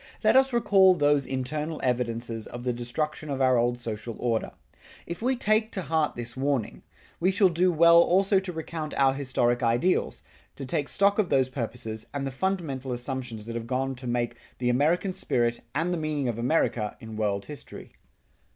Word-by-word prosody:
Let 220 +2 +4
us 265 0 +5
recall 195 -6 +5
those 145 -3 +2
internal 150 +4 -3
evidences 115 -2 -2
of 120 0 -8
the 125 -1 0
destruction 150 +6 -3
of 135 -1 -2
our 130 -2 +4
old 120 +1 +1
social 115 -1 -5
order. 115 -2 -1 0.5
If 170 +4 -6
we 260 +3 +1
take 220 -2 +2
to 190 - -3
heart 160 -2 0
this 120 0 -7
warning, 130 - -1 0.4
we 180 - +3
shall 195 0 +4
do 180 +2 +2
well 170 +1 +6
also 195 +3 +3
to 190 -1 -6
recount 160 -1 -5
our 135 -1 +4
historic 130 -3 0
ideals, 120 +10 +1 0.3
to 135 - -6
take 140 +2 -1
stock 200 +1 +2
of 205 - +2
those 130 -1 +2
purposes, 115 -3 -5
and 135 -1 -3
fundamental 140 -6 -2
assumptions 120 -3 -4
that 115 - -6
have 115 -1 -4
gone 135 +2 -1
to 130 0 -8
make 120 0 -1 0.2
the 125 -1 0
American 160 +9 +2
spirit 120 -10 0
and 165 +4 0
the 175 - -2
meaning 150 -3 -1
of 115 -1 -2
America 120 -5 0
in 110 -1 -9
world 100 -2 -1
history. 150 -1 -10
135 Hz, 180 wpm, -27 LUFS, 120-170 Hz, 0.5 s, well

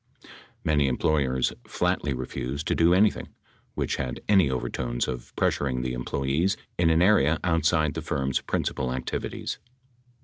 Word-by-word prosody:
Many 75 -2 +2
employers 65 -1 +1
flatly 90 -5 0
refused 65 +3 -4
to - - +3
do 85 +1 +4
anything 100 +4 +3 0.5
which - - -1
had 65 -1 -3
any 95 -8 +5
overtones - - -2
of 60 -2 -5
pressuring 65 -3 0
the 65 0 -2
employees 70 +8 0 0.2
in 85 -1 +4
an 80 +2 +4
area 80 -6 +4
outside 80 -3 +2
the - - -4
firm's 65 0 -1
principal 65 -2 -2
activities. 65 0 -4
70 Hz, 135 wpm, -26 LUFS, 65-80 Hz, 0.5 s, any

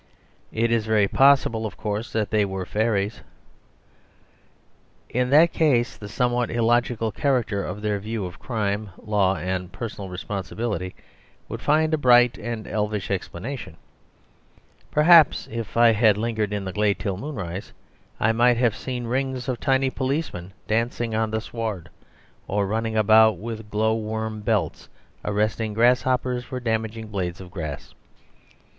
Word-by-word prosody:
It 115 +1 0
is 115 -2 +1
very 105 -2 +3
possible, 130 -4 +4
of - - -11
course, 105 +2 -3
that 110 -3 -1
they 105 -1 +3
were 95 -2 -3
fairies. 105 0 -1 1.9
In 125 +1 0
that 155 +5 +6
case 130 -7 +2
the 105 - -9
somewhat 120 +1 0
illogical 120 -1 +1
character 120 -9 0
of 100 +3 -6
their 105 -1 0
view 110 0 -4
of 90 -1 -9
crime, 105 -3 -2
law, 100 -3 +1
and 90 0 -3
personal 105 -2 -6
responsibility 95 +1 -4 0.5
would - - -6
find 155 +1 +2
a 155 - +2
bright 120 -2 +5
and 115 -3 -5
elfish 105 -1 -2
explanation; 100 - -5 1.1
perhaps 155 0 +6
if 115 -1 -5
I 120 -1 +7
had 110 -2 +4
lingered 110 -2 -1
in 100 -1 -3
the 95 - -5
glade 105 -1 +1
till 100 -3 -3
moonrise 95 - -6 0.5
I 110 - +3
might 120 +1 +3
have 120 -3 +2
seen 125 -2 -5
rings 130 +1 -2
of 125 -3 -2
tiny 135 0 +2
policemen 130 - -3
dancing 115 +1 -1
on 110 0 0
the 110 0 -2
sward; 110 -7 -5 0.6
or 100 0 0
running 110 +2 -1
about 110 -1 +5
with 110 +2 -7
glow 110 +1 +1
worm 110 0 -3
belts, 105 -5 -1 0.3
arresting 105 +1 -1
grasshoppers 125 +1 +2
for 125 +2 -6
damaging 110 -1 -2
blades 90 -4 -3
of 90 -2 -10
grass. 80 -7 -6
110 Hz, 145 wpm, -24 LUFS, 105-120 Hz, 1.9 s, I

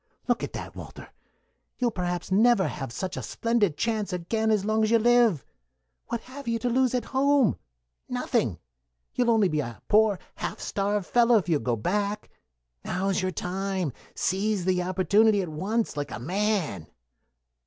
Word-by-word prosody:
Look - - +1
at - - -5
that, - - -7
Walter! - - -10 0.7
You'll 245 -2 +1
perhaps 180 -2 -3
never 215 0 +4
have 135 -4 -5
such 185 +9 -4
a - - -4
splendid 230 -9 0
chance 220 -3 -1
again 220 +6 -1
as 210 -2 +2
long 215 +1 +1
as 215 - +2
you 230 - +5
live. 235 - +3 0.6
What 235 -1 -3
have 265 +2 -11
you 230 0 +1
to 245 +2 -1
lose 255 0 +2
at 250 - -1
home? 275 -3 +3 0.5
Nothing. - - 0 0.6
You'll 245 -1 +1
only 220 -4 +4
be 155 -3 -1
a 120 -5 -4
poor 215 -2 +4 0.2
half - - -4
starved 200 0 -1
fellow 240 +1 +4
if 195 - -1
you 160 -4 +2
go 120 -1 0
back. 200 - -2 0.5
Now's 190 +2 -1
your 185 - 0
time. 185 -2 -2 0.2
Seize 195 0 0
the 185 -1 +2
opportunity 200 +4 +3
at 175 - -5
once, 205 +9 -2
like 145 -1 -3
a - - -5
man." 180 - -1
205 Hz, 165 wpm, -26 LUFS, 180-230 Hz, 0.7 s, you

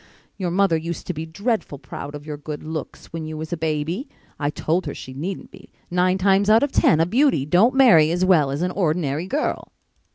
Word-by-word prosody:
Your 185 -3 -3
mother 180 -1 +2
used 170 +1 -5
to 180 - -3
be 160 +1 -6
dreadful 200 - -2
proud 140 +2 -8
of 145 0 -9
your 150 -1 -5
good 150 +1 -7
looks 155 -1 -7
when 165 -1 -4
you 155 0 -6
was 160 +2 -5
a - - +1
baby. 160 - -2 0.3
I 145 -1 0
told 165 +3 -1
her 145 - -4
she 130 - -9
needn't 175 +8 -6
be. - - -15 0.2
Nine 180 +1 +2
times 195 +1 +3
out 220 +3 +6
of 285 - 0
ten 155 - +3
a 165 - +4
beauty 230 - +2
don't 190 - +3
marry 220 - +6
as 175 +2 +1
well 165 -7 +4
as 140 +5 -2
an 180 - 0
ordinary 160 -3 -1
girl." 290 +8 -2
165 Hz, 220 wpm, -22 LUFS, 155-190 Hz, 0.3 s, out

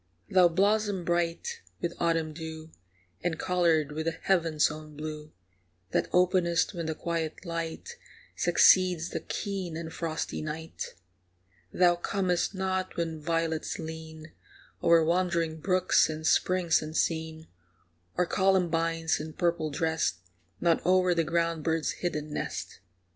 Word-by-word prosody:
Thou 185 -2 +6
blossom 200 +1 +1
bright 175 - -1 0.2
with 170 0 -2
autumn 165 -2 +1
dew, 160 0 -8 0.5
And 165 -2 -1
coloured 165 -5 +2
with 160 +2 -3
the 165 0 -1
heaven's 165 -6 +2
own 155 -1 -10
blue, 155 0 -6 0.6
That - - 0
openest 180 0 +2
when 170 -3 -4
the 160 - -2
quiet 165 +1 -3
light 170 - -5 0.4
Succeeds 180 -3 +4
the - - -2
keen 190 -5 -4
and 160 -1 -6
frosty 160 -2 -3
night. 155 +1 -6 0.8
Thou 175 -1 +4
comest 180 +1 0
not 190 0 -2
when 165 -2 -2
violets 165 0 -1
lean 160 -1 -8 0.5
O'er 165 -1 +5
wandering 170 -2 0
brooks 185 +1 +3
and 155 0 -5
springs 180 0 +3
unseen, 160 0 -2 0.7
Or 180 - +3
columbines, 165 -4 +1
in 155 +1 -6
purple 170 -3 0
dressed, 160 - 0 0.4
Nod 170 -1 +2
o'er 185 0 +4
the 165 -1 +2
ground 165 -1 0
bird's 160 0 0
hidden 150 -4 -3
nest. - - -4
165 Hz, 125 wpm, -29 LUFS, 160-180 Hz, 0.8 s, Thou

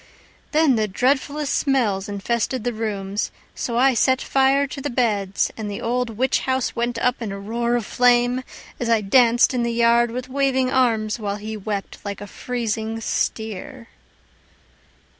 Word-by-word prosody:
Then 300 -5 +4
the 215 -1 +1
dreadfulest 275 +7 0
smells 220 -8 +1
infested 235 +4 -1
the 245 0 -1
rooms. 205 -2 -3 0.2
So 235 -1 -3
I 265 +2 +5
set 260 +2 +3
fire 270 +1 +2
to 275 0 -7
the 290 - -2
beds 210 -6 0
and 215 -2 -5
the 200 - -5
old 245 +1 -1
witch 260 +2 +2
house 260 -1 -1
Went 240 0 -1
up 250 +1 0
in 220 -3 -3
a 195 - -5
roar 235 +4 -1
of 235 -3 -1
flame, 245 0 +3 0.4
As 240 - -2
I 225 -2 +3
danced 240 +4 +4
in 250 - 0
the 235 0 0
yard 235 0 +3
with 250 +2 -5
waving 265 -1 +1
arms, 230 -4 +1
While 205 -2 -2
he 215 +1 -6
wept 205 -1 -5
like 200 -1 -5
a 205 - -7
freezing 225 0 -3
steer. 225 +3 -3
235 Hz, 165 wpm, -22 LUFS, 215-255 Hz, 0.4 s, I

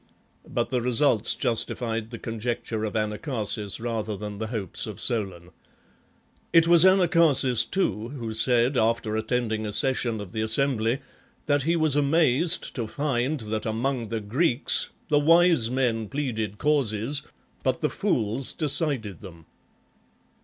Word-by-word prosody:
But - - -2
the 125 -2 0
results 120 -2 +2
justified 115 -1 -2
the 115 - -7
conjecture 115 -1 -4
of 105 - -5
Anacharsis 105 - -2
rather 110 -3 -3
than 105 0 -7
the 110 - -3
hopes 110 -6 -3
of - - -8
Solon. 95 -7 -2 1.0
It 165 -1 +5
was 170 -1 +6
Anacharsis, 170 - +4
too, 110 - -1
who 120 -5 -6
said, 120 +3 +2
after 110 -1 0
attending 110 0 -1
a 105 - -4
session 120 -1 0
of 100 -3 -8
the 110 - -3
assembly, 115 +1 0 0.4
that 145 -1 +2
he 165 +5 +1
was 155 -4 +1
amazed 155 +3 +3
to 115 -4 -4
find 140 +1 -2
that 110 0 -4
among 115 +1 -2
the 115 0 -3
Greeks, 125 +5 +2 0.2
the 145 -1 +4
wise 165 -5 +4
men 120 -4 -1
pleaded 110 -8 -3
causes, 140 -2 0 0.4
but - - -1
the - - +1
fools 115 +5 -1
decided 140 - -1
them. 85 -5 -12
120 Hz, 140 wpm, -25 LUFS, 110-145 Hz, 1.0 s, was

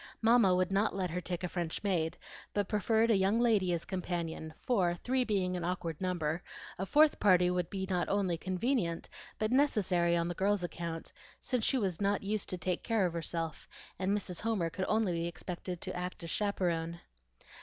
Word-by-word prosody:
Mamma 225 -5 +5
would 185 +1 +1
not 200 +2 +2
let 185 -3 -1
her 180 +2 -2
take 175 0 -4
a - - 0
French 175 0 -3
maid, 170 -5 0 0.4
but 205 -2 +1
preferred 225 +2 +2
a - - +5
young 195 +4 +3
lady 215 -7 +3
as 170 -1 -1
companion; 170 -3 -3
for, 185 -8 +1
three 255 +8 0
being 190 -5 0
an 175 - -3
awkward 170 -2 -3
number, 175 -3 -1 0.4
a 190 - -2
fourth 305 +5 +5
party 180 -3 +5
would 180 -1 -1
be 190 -2 -3
not 180 -2 0
only 195 -3 +1
convenient, 185 0 -1 0.3
but 215 +1 0
necessary 190 -11 +3
on 170 0 0
the 175 - -2
girl's 195 +1 +1
account, 170 -1 -5 0.3
since 250 -4 -1
she 270 - +2
was 195 -6 -1
not 200 0 +1
used 205 0 -1
to 185 - -2
take 180 0 -1
care 225 -4 +1
of 175 - -1
herself 165 -1 -3 0.3
and 190 0 0
Mrs. 180 -4 -4
Homer 210 -7 0
could 185 +2 -2
only 215 -4 +2
be 170 0 -1
expected 175 0 -5
to - - -4
act 180 0 -4
as 165 - -5
chaperone. 170 -5 -1
185 Hz, 195 wpm, -32 LUFS, 170-205 Hz, 0.4 s, Mamma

